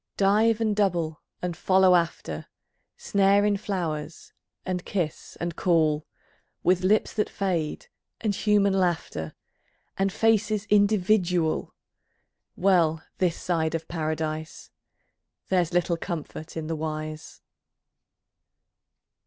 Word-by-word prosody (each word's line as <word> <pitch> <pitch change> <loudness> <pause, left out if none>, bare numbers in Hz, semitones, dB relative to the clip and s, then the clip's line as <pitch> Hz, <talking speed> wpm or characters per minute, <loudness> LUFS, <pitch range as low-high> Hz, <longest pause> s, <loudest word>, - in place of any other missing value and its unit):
Dive 215 +3 +3
and 215 -2 +1
double 170 -6 0 0.2
and 175 -2 -2
follow 190 +1 +4
after, 165 - -1 0.5
Snare 200 +1 +3
in 205 -1 +3
flowers, 170 -7 -4 0.3
and 180 -1 -2
kiss, 170 -6 -4
and 170 -1 -3
call, 155 -4 +2 0.6
With 180 0 +3
lips 210 +3 +2
that 210 - 0
fade, 175 -6 -2 0.3
and 215 -2 0
human 200 -1 +2
laughter 175 - -1 0.6
And 195 0 +2
faces 215 0 +2
individual, 190 -5 +2 0.8
Well 170 -4 +2 0.2
this 180 -3 +1
side 165 -2 0
of 165 0 -4
Paradise!... 155 -1 -4 0.8
There's 180 -3 +2
little 175 -1 +1
comfort 165 -1 -6
in 160 - -3
the 165 +1 -2
wise. 155 0 -6
175 Hz, 105 wpm, -26 LUFS, 160-200 Hz, 0.8 s, follow